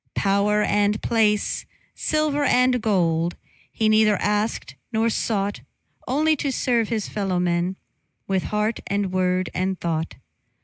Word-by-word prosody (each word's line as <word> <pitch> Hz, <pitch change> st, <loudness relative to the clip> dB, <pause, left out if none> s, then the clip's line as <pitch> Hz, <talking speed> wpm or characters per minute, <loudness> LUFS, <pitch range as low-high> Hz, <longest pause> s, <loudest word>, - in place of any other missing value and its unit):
Power 205 Hz, +1 st, +2 dB
and 205 Hz, +1 st, +1 dB
place, 210 Hz, -2 st, +1 dB, 0.3 s
silver 305 Hz, -2 st, 0 dB
and 250 Hz, -2 st, +3 dB
gold, 170 Hz, -5 st, +1 dB, 0.4 s
He 220 Hz, -, 0 dB
neither 215 Hz, -1 st, +4 dB
asked 210 Hz, +2 st, -1 dB, 0.2 s
nor 225 Hz, 0 st, +1 dB
sought; 205 Hz, -2 st, -1 dB, 0.5 s
Only 310 Hz, +4 st, +2 dB
to 280 Hz, -, -1 dB
serve 240 Hz, -4 st, 0 dB
his 220 Hz, -3 st, -2 dB
fellowmen, 180 Hz, -2 st, -1 dB, 0.5 s
With 190 Hz, -2 st, -1 dB
heart 210 Hz, +2 st, -1 dB
and 200 Hz, -1 st, -1 dB
word 185 Hz, 0 st, 0 dB
and 185 Hz, 0 st, -1 dB
thought. 165 Hz, -1 st, -2 dB
210 Hz, 125 wpm, -23 LUFS, 185-225 Hz, 0.5 s, neither